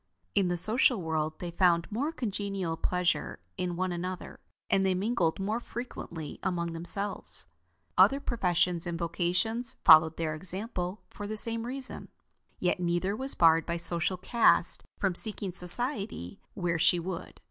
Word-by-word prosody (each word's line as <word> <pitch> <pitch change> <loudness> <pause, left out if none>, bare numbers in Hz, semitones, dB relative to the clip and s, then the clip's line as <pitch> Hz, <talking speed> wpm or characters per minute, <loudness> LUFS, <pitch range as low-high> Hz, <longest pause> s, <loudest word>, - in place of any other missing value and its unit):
In 200 -3 +2
the 175 0 -1
social 220 +5 +3
world, 160 -2 -2
they 175 -1 -6
found 170 -1 +3
more 275 +9 -1
congenial 200 - -3
pleasure 180 +2 -1 0.2
in 180 -1 -3
one 185 +1 -1
another, 180 +1 -5 0.3
and 195 - +2
they 190 -1 +2
mingled 190 -4 0
more 210 +4 -1
frequently 195 - -7
among 170 -3 -2
themselves. 175 +5 -4 0.5
Other 275 - +6
professions 180 -8 0
and 170 -1 -3
vocations 180 +8 -1
followed 160 0 +8
their 160 -2 -1
example 185 +3 -2
for 205 - -7
the 215 +1 -2
same 230 +1 +3
reason. 260 0 -7 0.5
Yet 180 0 0
neither 175 +3 0
was 265 +4 0
barred 165 -1 +4
by 170 0 -1
social 170 +2 -2
caste 190 -1 +4
from 195 -2 0
seeking 200 -1 0
society 195 - -3 0.2
where 175 -4 -1
she 175 - +4
would. 175 0 -6
180 Hz, 145 wpm, -29 LUFS, 170-210 Hz, 0.5 s, followed